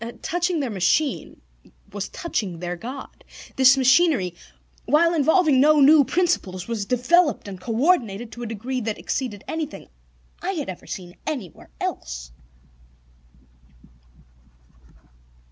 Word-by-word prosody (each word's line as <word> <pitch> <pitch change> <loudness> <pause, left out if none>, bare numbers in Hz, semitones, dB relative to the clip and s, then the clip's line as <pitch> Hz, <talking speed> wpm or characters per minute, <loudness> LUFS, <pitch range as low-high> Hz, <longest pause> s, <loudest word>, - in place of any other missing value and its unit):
Touching 350 0 0
their 260 -4 -3
machine 210 - 0 0.5
was 205 -1 -4
touching 205 - -3
their 175 +1 -4
God. 255 +9 -9 0.3
This 265 +1 +6
machinery, 260 - +3 0.5
while 335 +3 +3
involving 315 -2 +3
no 305 +1 +5
new 290 +1 +7
principles, 245 - -1
was 220 -4 -3
developed 255 - +2
and 190 -2 -8
coordinated 230 - 0
to 240 - -9
a 240 - -4
degree 240 +4 -4
that 220 -1 -3
exceeded 210 -7 -4
anything 315 -2 -5 0.5
I 385 - -2
had 300 - -4
ever 185 - -8
seen 180 -1 -8
anywhere 255 - -6
else. - - -5
255 Hz, 115 wpm, -23 LUFS, 200-310 Hz, 0.5 s, new